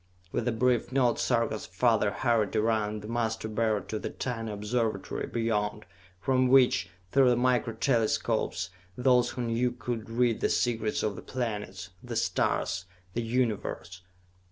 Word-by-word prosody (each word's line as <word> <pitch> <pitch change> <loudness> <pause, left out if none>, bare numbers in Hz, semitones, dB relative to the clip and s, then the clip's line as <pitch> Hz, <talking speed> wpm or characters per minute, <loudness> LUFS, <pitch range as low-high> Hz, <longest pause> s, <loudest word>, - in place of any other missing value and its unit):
With 120 0 -1
a - - +3
brief 120 +1 +1
nod 125 -3 +2
Sarka's 115 -3 0
father 105 +3 +2
hurried 115 -2 +1
around 110 -1 0
the - - -7
Master 110 -1 -1
Beryl 110 -1 0
to 110 - -4
the - - -4
tiny 115 -3 -4
Observatory 110 +2 -2
beyond, 105 -2 -1 0.3
from 130 +4 +2
which, 125 -9 +4 0.2
through 135 -2 +5
the 120 - +4
Micro 120 -2 +1
Telescopes, 110 -6 0 0.3
those 125 -1 +4
who 125 - -4
knew 120 +1 +1
could 115 -2 -5
read 115 0 +1
the - - +2
secrets 115 -3 0
of 105 -2 -1
the - - -8
planets, 105 -8 -4
the - - -6
stars 90 - 0 0.3
the 120 - -1
Universe. 110 -7 -2
115 Hz, 150 wpm, -29 LUFS, 105-125 Hz, 0.3 s, through